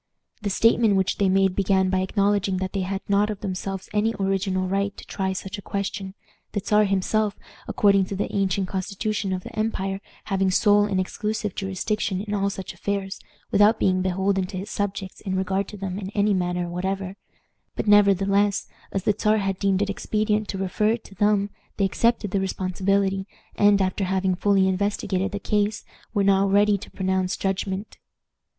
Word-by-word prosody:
The 205 Hz, -, -1 dB
statement 225 Hz, +1 st, +4 dB
which 190 Hz, -1 st, 0 dB
they 195 Hz, -2 st, +3 dB
made 190 Hz, -1 st, +3 dB
began 190 Hz, -1 st, +2 dB
by 190 Hz, -, +2 dB
acknowledging 200 Hz, 0 st, +1 dB
that 185 Hz, 0 st, -3 dB
they 200 Hz, -, -1 dB
had 190 Hz, +1 st, -3 dB
not 205 Hz, +1 st, +2 dB
of 210 Hz, -2 st, -5 dB
themselves 195 Hz, -1 st, -4 dB
any 220 Hz, +2 st, +1 dB
original 190 Hz, -1 st, 0 dB
right 200 Hz, +1 st, -1 dB
to -, -, -10 dB
try 190 Hz, -1 st, -2 dB
such 195 Hz, +2 st, -5 dB
a -, -, -8 dB
question, 200 Hz, 0 st, -4 dB, 0.4 s
the 205 Hz, -, 0 dB
Czar 210 Hz, +1 st, +3 dB
himself, 200 Hz, +2 st, 0 dB, 0.3 s
according 200 Hz, -2 st, +3 dB
to 195 Hz, -, -5 dB
the 195 Hz, -, -3 dB
ancient 195 Hz, -1 st, +1 dB
constitution 200 Hz, +2 st, -2 dB
of 185 Hz, -1 st, -2 dB
the -, -, -10 dB
empire, 195 Hz, -3 st, -2 dB, 0.2 s
having 195 Hz, -2 st, +1 dB
sole 205 Hz, +2 st, +4 dB
and 195 Hz, -2 st, 0 dB
exclusive 210 Hz, +1 st, -2 dB
jurisdiction 195 Hz, 0 st, -2 dB
in 210 Hz, +1 st, -4 dB
all 200 Hz, -1 st, +1 dB
such 195 Hz, -1 st, -6 dB
affairs, 200 Hz, -1 st, -3 dB, 0.3 s
without 210 Hz, +2 st, +5 dB
being 185 Hz, -1 st, +2 dB
beholden 190 Hz, +1 st, 0 dB
to 185 Hz, -, -6 dB
his 195 Hz, +3 st, -6 dB
subjects 195 Hz, -2 st, -3 dB
in 190 Hz, -2 st, -3 dB
regard 190 Hz, +1 st, 0 dB
to 210 Hz, -, -9 dB
them 190 Hz, -1 st, -4 dB
in 190 Hz, -2 st, -5 dB
any 205 Hz, 0 st, +3 dB
manner 180 Hz, -1 st, -1 dB
whatever; 190 Hz, +2 st, -3 dB, 0.6 s
but, -, -, -2 dB
nevertheless, 200 Hz, 0 st, +4 dB, 0.2 s
as 195 Hz, -, -2 dB
the 210 Hz, -, +3 dB
Czar 215 Hz, +1 st, +2 dB
had 195 Hz, -2 st, -1 dB
deemed 195 Hz, -1 st, +2 dB
it 205 Hz, -, -3 dB
expedient 215 Hz, +1 st, 0 dB
to 195 Hz, -, -4 dB
refer 195 Hz, +2 st, 0 dB
it 235 Hz, -, -5 dB
to -, -, -14 dB
them, 205 Hz, +1 st, +2 dB, 0.3 s
they 195 Hz, -, +2 dB
accepted 225 Hz, +1 st, +1 dB
the 195 Hz, -, +1 dB
responsibility, 190 Hz, +1 st, 0 dB, 0.3 s
and, 205 Hz, -1 st, +5 dB
after 190 Hz, +1 st, 0 dB
having 190 Hz, 0 st, +1 dB
fully 190 Hz, +1 st, +3 dB
investigated 195 Hz, 0 st, -1 dB
the 205 Hz, -, -3 dB
case, 210 Hz, +1 st, 0 dB, 0.3 s
were 205 Hz, -3 st, +1 dB
now 195 Hz, 0 st, +4 dB
ready 205 Hz, +1 st, +4 dB
to -, -, -10 dB
pronounce 190 Hz, 0 st, -1 dB
judgment. 195 Hz, +1 st, -3 dB
195 Hz, 185 wpm, -24 LUFS, 190-205 Hz, 0.6 s, without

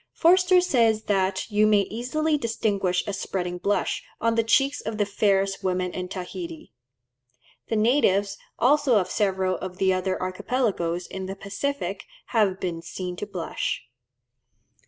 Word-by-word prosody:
Forster 365 Hz, +1 st, +5 dB
says 230 Hz, -10 st, +2 dB
that 190 Hz, 0 st, 0 dB
"you 210 Hz, +1 st, +4 dB
may 210 Hz, -1 st, +5 dB
easily 255 Hz, +10 st, -1 dB
distinguish 205 Hz, -8 st, 0 dB
a 205 Hz, -, -3 dB
spreading 180 Hz, -2 st, -3 dB
blush" 200 Hz, +3 st, 0 dB, 0.2 s
on 230 Hz, 0 st, +2 dB
the 230 Hz, 0 st, +2 dB
cheeks 270 Hz, +5 st, +2 dB
of 220 Hz, -1 st, -4 dB
the 205 Hz, -, +2 dB
fairest 195 Hz, -1 st, +1 dB
women 185 Hz, -1 st, 0 dB
in 180 Hz, 0 st, -4 dB
Tahiti. 315 Hz, -, -7 dB, 0.9 s
The 225 Hz, -, -1 dB
natives 210 Hz, -4 st, +3 dB, 0.2 s
also 265 Hz, -2 st, +4 dB
of 185 Hz, -, 0 dB
several 190 Hz, -2 st, +1 dB
of 185 Hz, -1 st, -7 dB
the 190 Hz, -1 st, +3 dB
other 185 Hz, 0 st, -1 dB
archipelagoes 185 Hz, -3 st, -1 dB
in 190 Hz, +1 st, -6 dB
the 195 Hz, -, -5 dB
Pacific 280 Hz, +9 st, -3 dB, 0.2 s
have 205 Hz, -5 st, +2 dB
been 170 Hz, -3 st, -3 dB
seen 180 Hz, +1 st, -5 dB
to 210 Hz, -, -5 dB
blush. 180 Hz, -10 st, -3 dB
200 Hz, 145 wpm, -25 LUFS, 185-230 Hz, 0.9 s, Forster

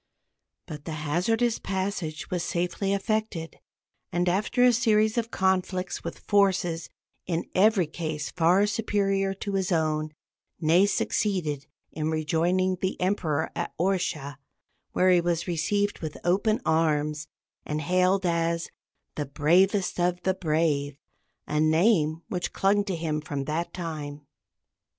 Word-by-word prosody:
But 150 Hz, -1 st, -9 dB
the 160 Hz, -, -4 dB
hazardous 225 Hz, +10 st, +1 dB
passage 190 Hz, -4 st, -3 dB
was 180 Hz, -1 st, 0 dB
safely 180 Hz, +3 st, -1 dB
effected, 200 Hz, -4 st, -2 dB, 0.5 s
and 175 Hz, +1 st, 0 dB
after 205 Hz, +7 st, +2 dB
a 250 Hz, -1 st, +6 dB
series 220 Hz, -2 st, +3 dB
of 230 Hz, -1 st, -1 dB
conflicts 185 Hz, -1 st, 0 dB
with -, -, -5 dB
forces 185 Hz, -5 st, +1 dB, 0.4 s
in 170 Hz, -2 st, -2 dB
every 200 Hz, -1 st, +4 dB
case 155 Hz, -1 st, -4 dB
far 180 Hz, +4 st, +3 dB
superior 195 Hz, -2 st, 0 dB
to 200 Hz, +1 st, -5 dB
his 190 Hz, 0 st, 0 dB
own, 155 Hz, -2 st, 0 dB, 0.4 s
Ney 170 Hz, +5 st, +4 dB
succeeded 175 Hz, -8 st, -1 dB, 0.2 s
in 155 Hz, 0 st, -2 dB
rejoining 170 Hz, +4 st, +1 dB
the 190 Hz, -, -2 dB
Emperor 165 Hz, -5 st, 0 dB
at -, -, -4 dB
Orsha, 170 Hz, -7 st, -1 dB, 0.6 s
where 185 Hz, 0 st, +4 dB
he 175 Hz, -1 st, +5 dB
was 170 Hz, -1 st, -1 dB
received 200 Hz, +5 st, 0 dB
with 155 Hz, -2 st, -5 dB
open 200 Hz, +5 st, +2 dB
arms, 150 Hz, -2 st, +1 dB, 0.4 s
and 150 Hz, 0 st, -3 dB
hailed 185 Hz, +3 st, +2 dB
as 170 Hz, 0 st, 0 dB, 0.4 s
"the 145 Hz, -3 st, -4 dB
bravest 180 Hz, +8 st, +2 dB
of 175 Hz, 0 st, 0 dB
the 190 Hz, -, +2 dB
brave" 150 Hz, -5 st, 0 dB, 0.5 s
a 150 Hz, +1 st, -1 dB
name 160 Hz, 0 st, +3 dB
which 180 Hz, -2 st, -3 dB
clung 205 Hz, +1 st, +2 dB
to 195 Hz, -3 st, -2 dB
him 155 Hz, -2 st, -2 dB
from 145 Hz, -2 st, -4 dB
that 155 Hz, +4 st, -2 dB
time. 150 Hz, -4 st, -6 dB
175 Hz, 130 wpm, -27 LUFS, 155-195 Hz, 0.6 s, a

